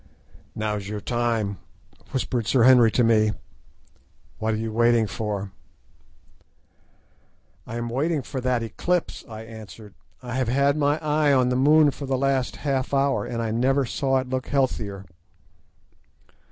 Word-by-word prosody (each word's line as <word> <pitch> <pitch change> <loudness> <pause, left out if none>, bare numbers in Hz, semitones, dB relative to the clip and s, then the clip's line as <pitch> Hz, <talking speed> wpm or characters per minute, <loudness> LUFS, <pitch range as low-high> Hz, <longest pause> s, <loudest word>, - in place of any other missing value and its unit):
"Now's 105 -2 -3
your 105 0 -4
time," 115 -4 -1 0.5
whispered 125 -4 -2
Sir 120 +2 +3
Henry 125 -2 +7
to 120 - +1
me; 110 -2 +3 1.1
"what 110 0 0
are - - -3
you 110 0 -4
waiting 120 0 +3
for?" 100 -2 -4 2.2
"I 115 - -6
am 120 0 -3
waiting 145 +5 -1
for 130 +1 -5
that 125 -2 0
eclipse," 175 +9 -2
I 110 0 -8
answered; 110 -2 -11 0.3
"I 120 -1 -6
have 130 -2 0
had 140 +3 +2
my 145 0 +1
eye 150 -1 +2
on 130 -2 +3
the 125 - 0
moon 150 +3 +5
for 140 0 -8
the 135 0 0
last 135 -1 0
half 135 -1 0
hour, 135 -2 +1
and 115 -1 -3
I 110 - -2
never 135 +4 +2
saw 135 +2 0
it 130 -1 -2
look 130 0 -3
healthier." 110 -8 -1
125 Hz, 150 wpm, -24 LUFS, 110-135 Hz, 2.2 s, Henry